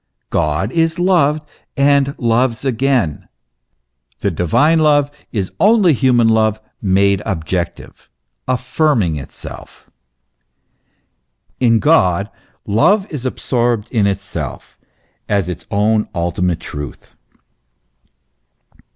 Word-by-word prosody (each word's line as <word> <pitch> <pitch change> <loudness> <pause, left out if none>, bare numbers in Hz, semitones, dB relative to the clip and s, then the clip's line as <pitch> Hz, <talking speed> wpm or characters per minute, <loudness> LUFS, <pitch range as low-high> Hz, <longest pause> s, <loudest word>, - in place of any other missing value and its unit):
God 75 +8 0
is 165 +1 +1
loved 155 -5 +2 0.3
and 140 0 +3
loves 120 +2 0
again; 125 - 0 0.9
the 100 - 0
divine 140 - +2
love 145 -2 +3 0.2
is 100 -5 -3
only 205 -5 +5
human 125 -3 +3
love 110 -1 +2 0.2
made 100 -1 +2
objective, 85 0 -4 0.4
affirming 125 - +1
itself. 70 - -10 1.7
In 115 -3 +4
God 100 - +2 0.3
love 190 - +3
is 135 -4 -3
absorbed 120 -4 -1
in 110 -5 +2
itself 95 -8 -5 0.5
as 100 -4 +1
its 90 -3 -7
own 105 +1 +1
ultimate 85 0 -1
truth. 75 -2 -8
115 Hz, 90 wpm, -17 LUFS, 95-140 Hz, 1.7 s, only